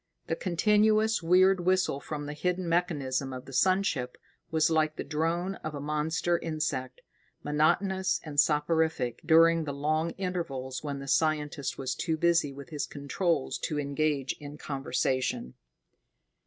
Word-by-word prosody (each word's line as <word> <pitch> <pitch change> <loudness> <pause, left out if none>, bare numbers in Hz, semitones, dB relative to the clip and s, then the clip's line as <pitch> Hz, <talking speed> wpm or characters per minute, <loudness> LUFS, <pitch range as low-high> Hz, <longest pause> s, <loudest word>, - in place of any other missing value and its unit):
The 165 - -1
continuous 215 +5 +2
weird 185 +3 +4
whistle 185 -5 +1
from 145 0 -5
the 145 - -5
hidden 180 +3 -2
mechanism 145 -6 0
of 130 -1 -7
the 135 - -11
sun 185 +7 +3
ship 125 -10 -2 0.3
was 160 0 +2
like 155 -1 +2
the - - -4
drone 170 +5 -1
of 155 -1 -6
a - - -4
monster 155 +4 0
insect, 150 -5 -3 0.4
monotonous 185 +6 +1
and 150 -2 -3
soporific 150 -4 +1
during 165 0 +5
the 145 - -3
long 155 +3 0
intervals 150 -9 -4
when 145 -2 -3
the 135 0 -8
scientist 150 0 0
was 130 -1 -2
too 160 -2 -2
busy 170 -3 +2
with 140 0 -10
his 150 -2 -3
controls 145 +1 -1
to 150 - -2
engage 140 -1 0
in 145 0 -9
conversation. 130 - -2
155 Hz, 145 wpm, -29 LUFS, 140-170 Hz, 0.4 s, during